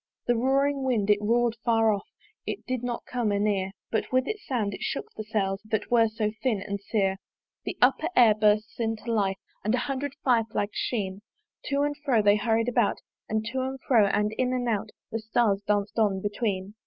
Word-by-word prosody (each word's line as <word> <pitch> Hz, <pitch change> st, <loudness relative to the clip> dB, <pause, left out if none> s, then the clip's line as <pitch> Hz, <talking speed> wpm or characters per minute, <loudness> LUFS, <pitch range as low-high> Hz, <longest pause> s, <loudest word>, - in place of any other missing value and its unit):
The 240 Hz, -, +2 dB
roaring 275 Hz, +3 st, +2 dB
wind! 220 Hz, -6 st, +2 dB
it 205 Hz, 0 st, +3 dB
roar'd 235 Hz, +2 st, +2 dB
far 225 Hz, -2 st, +3 dB
off, 200 Hz, -, -5 dB, 0.4 s
It -, -, -4 dB
did 255 Hz, -2 st, -2 dB
not 245 Hz, -1 st, -4 dB
come 240 Hz, -4 st, -1 dB
anear; 200 Hz, -2 st, +1 dB, 0.2 s
But 220 Hz, -, -1 dB
with 255 Hz, +1 st, +2 dB
its 430 Hz, -1 st, -4 dB
sound 220 Hz, -7 st, -1 dB
it -, -, -8 dB
shook -, -, -2 dB
the 215 Hz, -, -5 dB
sails 200 Hz, -2 st, -1 dB
That 215 Hz, 0 st, -3 dB
were 230 Hz, -2 st, +5 dB
so 215 Hz, -1 st, -2 dB
thin 240 Hz, -6 st, +1 dB
and 200 Hz, +1 st, -4 dB
sere. 195 Hz, -2 st, 0 dB, 0.5 s
The -, -, -4 dB
upper 270 Hz, +5 st, +3 dB
air 230 Hz, -3 st, +7 dB
bursts 215 Hz, +1 st, +1 dB
into 225 Hz, 0 st, -2 dB
life, 195 Hz, -3 st, +1 dB, 0.3 s
And 215 Hz, +3 st, +2 dB
a 250 Hz, -, -1 dB
hundred 275 Hz, 0 st, -3 dB
fire 235 Hz, -4 st, +3 dB
flags 205 Hz, -1 st, -1 dB
sheen 195 Hz, -5 st, -2 dB, 0.5 s
To 280 Hz, 0 st, +1 dB
and 290 Hz, 0 st, 0 dB
fro 245 Hz, -7 st, +3 dB
they 205 Hz, 0 st, +6 dB
are 205 Hz, -, -5 dB
hurried 225 Hz, 0 st, +2 dB
about; 235 Hz, -4 st, +2 dB, 0.3 s
And 220 Hz, 0 st, -1 dB
to 260 Hz, 0 st, -1 dB
and 265 Hz, +1 st, -3 dB
fro, 225 Hz, -6 st, +4 dB
and 210 Hz, +2 st, +1 dB
in 255 Hz, 0 st, +1 dB
and 250 Hz, -1 st, -1 dB
out 215 Hz, -4 st, -1 dB, 0.2 s
The 225 Hz, -, -2 dB
stars 220 Hz, -2 st, +1 dB
dance 205 Hz, -1 st, +1 dB
on 205 Hz, -4 st, +2 dB
between. 205 Hz, -1 st, -2 dB
225 Hz, 205 wpm, -27 LUFS, 205-245 Hz, 0.5 s, air